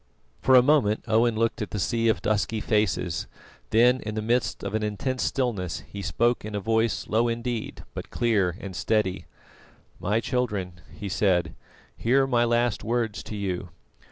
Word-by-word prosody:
For 130 - +5
a 125 - +8
moment 125 -7 +3
Owen 115 +1 +3
looked 115 0 0
at 105 - -3
the - - -4
sea 115 +4 0
of 110 - +1
dusky 110 +1 0
faces, 105 -7 0 0.4
then 125 +3 +5
in 105 -2 -5
the 110 - -1
midst 120 +2 0
of - - -4
an 110 - 0
intense 110 +5 -2
stillness, 110 -10 -1
he 100 - -9
spoke 120 +8 +1
in 105 0 -5
a - - 0
voice 110 +2 0
low 115 +2 +2
indeed 115 -1 -3
but - - -7
clear 100 -7 +1
and 95 -2 -7
steady: 105 -3 0 0.7
"My 105 +4 +1
children," 105 -8 -2
he 90 +5 -7
said, 95 -2 +1 0.4
"hear 135 +4 +3
my 120 -3 +2
last 120 -1 +1
words 115 -2 -1
to 105 - -7
you. 95 -3 -3
110 Hz, 170 wpm, -26 LUFS, 100-120 Hz, 0.7 s, a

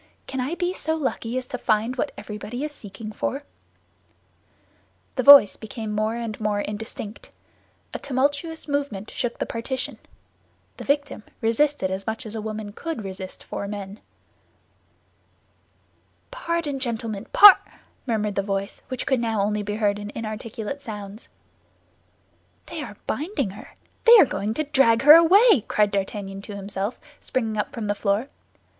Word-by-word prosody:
"Can 265 -1 -3
I 275 +7 -2
be 355 +1 -1
so 320 -3 -2
lucky 255 -5 -2
as 255 - -3
to 250 - -6
find 220 +4 +1
what 250 - -2
everybody 215 +5 -6
is 300 - -3
seeking 215 -4 -9
for?" 275 +6 -3 1.7
The 255 - +1
voice 275 -6 +9
became 220 0 -6
more 215 +2 0
and 230 -2 -5
more 210 -1 0
indistinct; 210 +1 -6 0.6
a - - -4
tumultuous 285 +5 -1
movement 280 -8 -3
shook 245 -1 -3
the - - -2
partition. 255 +3 -4 0.8
The - - -8
victim 285 -4 0 0.2
resisted 230 -2 +1
as 190 +1 -4
much 220 +3 -3
as 215 - -7
a 220 - -4
woman 215 -1 -5
could 320 -3 -5
resist 190 -1 -7
four 200 - -5
men. 200 0 -7 2.3
"Pardon, 335 - -2
gentlemen—par—" 230 - +6 0.5
murmured 215 -3 0
the 200 - 0
voice, 195 0 -3
which 255 -1 -4
could 265 -3 +1
now 225 -3 0
only 210 +1 0
be 205 0 -3
heard 205 -1 +1
in 205 0 -6
inarticulate 225 +3 -5
sounds. 210 -3 -8 1.4
"They 330 -2 -6
are 210 -8 -8
binding 285 - -2
her; 205 - -13 0.3
they 470 0 +10
are 390 - +8
going 210 -2 -3
to 310 - 0
drag 270 -5 +3
her 295 +2 +11
away," 355 - +7
cried 210 -1 +2
D'Artagnan 195 0 -3
to 205 0 -8
himself, 200 +2 -4 0.2
springing 225 -4 -2
up - - -2
from 230 -3 -5
the 205 - +1
floor. 205 +5 -1
225 Hz, 150 wpm, -24 LUFS, 205-280 Hz, 2.3 s, her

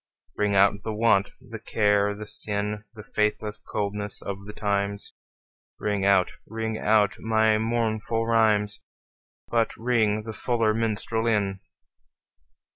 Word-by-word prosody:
Ring 105 -1 +1
out 100 +1 +4
the 110 0 -4
want, 105 -3 +3
the 115 -1 -9
care 105 -2 +2
the 105 +1 -7
sin, 105 0 -1
The 105 - -9
faithless 105 0 -1
coldness 105 0 -3
of 100 0 -6
the - - -6
times; 100 -1 -2 0.7
Ring 100 -2 -1
out, 95 -2 +4 0.2
ring 110 0 -3
out 105 -1 +2
my 110 -1 +2
mournful 115 0 0
rhymes, 110 -3 +2 0.7
But 115 -1 +1
ring 110 -3 +1
the 110 0 -6
fuller 115 -2 +1
minstrel 115 0 -1
in. 100 -3 +1
105 Hz, 125 wpm, -26 LUFS, 100-110 Hz, 0.7 s, out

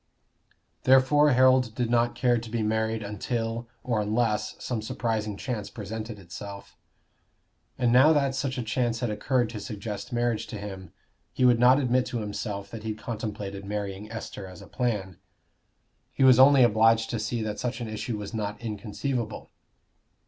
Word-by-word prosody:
Therefore 135 +3 +5
Harold 130 -2 +4
did 120 -2 -1
not 120 0 +2
care 120 -2 +2
to 115 0 -9
be 115 0 -1
married 110 0 0
until 115 +3 -3 0.2
or 115 -4 0
unless 105 0 0
some 120 -3 -3
surprising 110 -2 -2
chance 115 -5 -4
presented 110 +1 -6
itself; 100 +2 -9 1.0
and 125 -2 +2
now 130 +5 +7
that 140 -3 +2
such 135 -1 -2
a 125 - -2
chance 120 +1 -1
had 120 -3 0
occurred 120 +3 +1
to 110 - -6
suggest 105 0 -6
marriage 120 -2 0
to 110 - -6
him, 95 -3 -8 0.4
he 130 - +2
would 120 -2 +5
not 125 +3 +6
admit 125 -2 +1
to 125 - -3
himself 105 -2 -4
that 115 - -7
he 110 0 -3
contemplated 105 -3 -5
marrying 100 +1 -5
Esther 115 -3 -7
as 90 -2 -11
a - - -11
plan; 100 -8 -2 0.9
he - - 0
was 130 -2 +7
only 135 0 +8
obliged 115 0 +4
to 115 - -2
see 115 +1 -2
that 105 -1 -4
such 125 -1 -3
an 120 - -4
issue 110 +1 -4
was 105 +2 -7
not 105 -2 -3
inconceivable. 110 +2 -4
115 Hz, 165 wpm, -27 LUFS, 105-125 Hz, 1.0 s, only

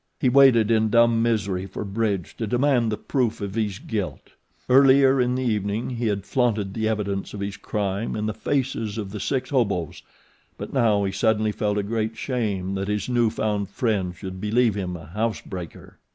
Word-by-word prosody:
He 130 - +3
waited 125 -4 +5
in 110 -1 +3
dumb 115 0 +4
misery 100 -5 0
for - - -6
Bridge 100 -3 -2
to 110 - -3
demand 125 -1 +2
the 105 - -2
proof 120 -5 -1
of 100 -1 -4
his 105 -3 -1
guilt. 105 -4 -5 0.4
Earlier 135 0 +6
in 125 0 +1
the 130 - -1
evening 105 0 -1
he 120 -1 -2
had 100 -2 -1
flaunted 105 -5 0
the 110 0 -1
evidence 100 -2 -2
of - - -6
his 100 0 -4
crime 100 +1 -3
in 105 0 -2
the 110 - -1
faces 125 -5 -2
of 100 -3 -4
the 105 - -5
six 130 +6 -2
hobos; 100 - 0 0.6
but - - -7
now 110 -6 +3
he 95 - -1
suddenly 110 0 +1
felt 105 0 -1
a 105 - 0
great 110 +1 -2
shame 105 -8 -2
that 95 0 -3
his 105 +2 -2
new 120 -2 +3
found 105 -3 -2
friend 100 -6 -1
should 95 0 -8
believe 115 +2 +2
him 90 -3 -4
a 80 - -11
house 105 +7 -2
breaker. 90 -4 -9
110 Hz, 195 wpm, -24 LUFS, 100-120 Hz, 0.6 s, Earlier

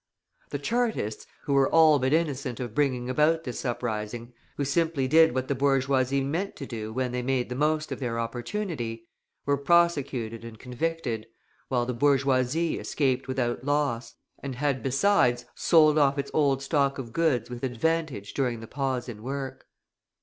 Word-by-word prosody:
The - - -3
Chartists, 220 - -1 0.2
who 140 - -1
were 135 -1 +4
all 160 -2 +6
but 130 +1 0
innocent 140 -6 0
of 120 -4 -5
bringing 130 -3 0
about 150 +5 +2
this 125 -5 -5
uprising, 120 -1 -3 0.2
who 140 - 0
simply 145 -1 +1
did 160 -1 +5
what 130 0 -1
the - - +1
bourgeoisie 135 0 +2
meant 165 +9 -2
to 140 - -7
do 110 -4 -6
when 125 +1 -2
they 125 0 -2
made 125 -1 -1
the 125 - -4
most 155 +2 0
of - - -4
their 120 -3 -2
opportunity, 120 - -4 0.4
were 140 0 +2
prosecuted 140 -8 +1
and 115 -1 -9
convicted, 125 -2 -3 0.4
while 125 -2 0
the 125 - -2
bourgeoisie 135 +4 +2
escaped 130 -3 0
without 125 -2 -1
loss, 145 -4 -1 0.2
and 135 -2 -5
had, 135 -1 0
besides, 130 - +2
sold 155 -2 +4
off 140 -1 +3
its 140 0 -3
old 140 -3 +2
stock 140 -1 +1
of 120 -4 -7
goods 140 -9 +1
with 120 -1 -6
advantage 135 -3 -1
during 125 -4 -1
the 115 - -8
pause 130 0 -2
in 110 -3 -8
work. 135 +2 -5
135 Hz, 165 wpm, -27 LUFS, 120-150 Hz, 0.4 s, all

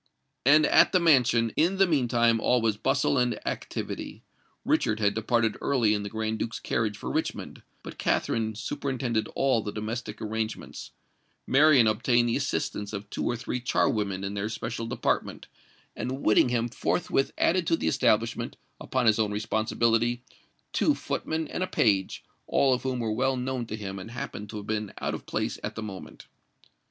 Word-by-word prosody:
And 150 +2 +7
at - - +5
the 185 - +5
mansion, 125 -8 +4
in 175 +5 +2
the 195 - +5
meantime, 120 -7 +2
all 125 +2 +3
was 110 -2 +1
bustle 135 +4 +1
and 125 -3 0
activity. - - -5 0.4
Richard 110 0 +1
had 100 -1 +2
departed 110 0 0
early 120 -6 +2
in 105 - -1
the 100 - -5
Grand 110 +1 -3
Duke's 115 - -3
carriage 110 -2 -1
for - - -5
Richmond; - - -3 0.2
but - - -10
Katherine 110 -1 0
superintended 120 -2 -2
all 130 -4 +2
the 105 - -5
domestic 110 +3 -5
arrangements; 110 0 -4 0.6
Marian 140 -3 +5
obtained 120 +2 +2
the 115 - +1
assistance 135 -7 -2
of 100 0 -6
two - - -3
or 120 - 0
three 120 +1 -4
char 120 - +2
women 100 -3 -1
in 100 +1 -4
her 105 +2 -2
special 115 +1 -4
department; 120 - -2 0.5
and 130 +3 -4
Whittingham 120 +2 +3
forthwith 135 +2 0
added 175 -1 +2
to 165 - +3
the - - -2
establishment, 115 -2 +1 0.2
upon 130 -2 -1
his 110 -1 +4
own 105 -2 +1
responsibility, 115 +3 0 0.5
two - - +3
footmen 160 0 -3
and - - -5
a 185 - 0
page, 100 - +1 0.2
all 135 -2 +3
of 125 - -1
whom 130 -1 -2
were 110 -2 -1
well 130 +3 +1
known 125 -1 -3
to 110 - -4
him 100 -2 -6
and 95 - -8
happened 110 -3 -6
to 110 - -6
have 105 - -7
been 105 -1 -3
out - - -2
of - - -7
place - - -2
at - - -4
the 110 - -5
moment. 95 -3 -9
115 Hz, 175 wpm, -27 LUFS, 110-130 Hz, 0.6 s, And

